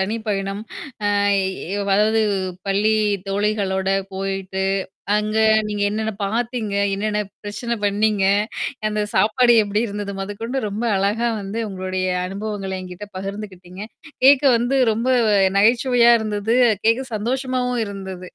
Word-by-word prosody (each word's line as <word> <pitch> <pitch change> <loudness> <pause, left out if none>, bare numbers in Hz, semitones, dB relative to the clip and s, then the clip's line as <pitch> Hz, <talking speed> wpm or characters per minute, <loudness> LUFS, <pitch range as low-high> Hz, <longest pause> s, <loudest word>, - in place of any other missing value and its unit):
தனி 200 +4 -1
பயணம். 195 0 -2 0.5
அ 205 - +2 0.2
ஏ 190 -2 -4 0.3
அதாவது 220 +2 +3 0.5
பள்ளி 205 +2 +2 0.4
தோழிகளோட 195 -1 0 0.2
போயிட்டு, 190 0 -3 0.5
அங்க 210 +1 -1 0.3
நீங்க 205 -1 -3
என்னென்ன 220 +1 -2
பாத்தீங்க? 225 +1 -2 0.2
என்னென்ன 210 +1 -1 0.2
பிரச்சனை 235 +3 -3
பண்ணீங்க? 205 0 +2 0.6
அந்த 210 0 -1
சாப்பாடு 240 +3 +4
எப்படி 205 0 -1
இருந்தது 205 -1 -5
மொதகொண்டு 215 +6 -4
ரொம்ப 205 +3 -4
அழகா 210 +5 +1
வந்து 200 +3 -5
உங்களுடைய 185 -1 -3 0.2
அனுபவங்கள 195 0 -5
என்கிட்ட 185 +3 -9
பகிர்ந்துக்கிட்டீங்க. 195 -2 -7 0.4
கேட்க 275 +1 +7
வந்து 245 +4 0
ரொம்ப 230 +4 -1 0.5
நகைச்சுவையா 240 +3 +4
இருந்தது. 215 +1 -1 0.3
கேட்க 230 +3 +3
சந்தோஷமாவும் 250 +1 -1
இருந்தது. 190 -2 -7
210 Hz, 115 wpm, -21 LUFS, 195-225 Hz, 0.6 s, கேட்க